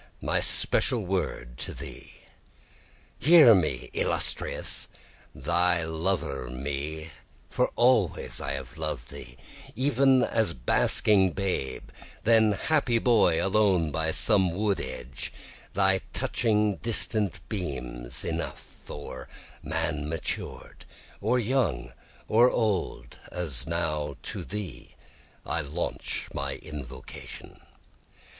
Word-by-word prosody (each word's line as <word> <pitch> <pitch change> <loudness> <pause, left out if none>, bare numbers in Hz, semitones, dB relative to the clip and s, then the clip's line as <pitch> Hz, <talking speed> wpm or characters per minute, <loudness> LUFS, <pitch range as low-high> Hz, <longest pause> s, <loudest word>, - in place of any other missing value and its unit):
my - - +1
special 115 -6 +3
word 75 -10 -3
to - - -4
thee. - - -9 1.0
Hear 155 -5 +8
me 80 - 0
illustrious! - - +1 0.5
Thy 85 +4 +2
lover 80 -6 -2
me, 70 +5 -4 0.4
for - - +1
always 120 -8 +2
I 70 - -3
have 65 -2 -7
loved - - -4
thee, 60 +1 -9 0.4
Even 130 0 +3
as 110 -10 +1
basking 95 - +3
babe, 95 -9 -2 0.4
then 110 -2 +4
happy 130 0 +1
boy 110 -9 +3
alone 95 -5 +2
by 80 +2 0
some 95 +2 +4
wood 100 0 0
edge, 65 0 -6 0.4
thy 95 0 +4
touching 105 -3 +1
distant 110 -4 0
beams 65 - -4
enough, - - -6
Or 75 - -8 0.3
man 80 -1 -2
matured, 80 0 -4 0.4
or 125 - +1
young 100 - -1 0.3
or 120 +3 +5
old, 95 - -2
as 75 -7 +1
now 75 -4 -2
to - - -4
thee 95 -11 -7 0.5
I 80 - -1
launch 75 +4 -3
my 70 -1 -3
invocation. 65 -4 -9
85 Hz, 105 wpm, -27 LUFS, 70-105 Hz, 1.0 s, Hear